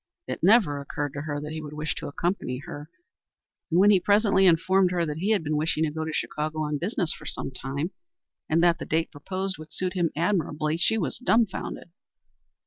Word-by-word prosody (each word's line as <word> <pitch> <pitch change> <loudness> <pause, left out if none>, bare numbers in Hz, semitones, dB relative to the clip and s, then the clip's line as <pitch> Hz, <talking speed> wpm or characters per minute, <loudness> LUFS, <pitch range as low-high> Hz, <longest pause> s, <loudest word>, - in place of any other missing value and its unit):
It - - -5
never 180 -7 +4
occurred 145 0 -4
to 145 - -4
her 145 -1 -3
that 150 +1 -6
he 155 0 -4
would 150 -1 -8
wish 150 0 -2
to - - -5
accompany 155 -3 -2
her, 145 +1 -8 0.8
and 170 +1 +3
when 205 +2 +7
he 195 - +5
presently 200 0 +4
informed 185 +2 +4
her 175 -1 0
that 150 -1 -4
he 190 +6 -1
had 210 -6 +2
been 155 0 -1
wishing 155 +1 +1
to 155 - 0
go 160 +1 -3
to 160 - -3
Chicago 155 0 -2
on 150 -1 -1
business 180 -1 -1
for - - -11
some 135 - -3
time, 140 +6 -4 0.6
and 165 +2 +3
that 170 -1 +4
the - - -5
date 160 +1 0
proposed 190 +5 -4
would 155 0 -11
suit 185 +3 -2
him 175 -4 +1
admirably, 155 -3 0
she 220 +6 +2
was 160 -11 -2
dumfounded. 225 -7 0
160 Hz, 210 wpm, -26 LUFS, 150-185 Hz, 0.8 s, when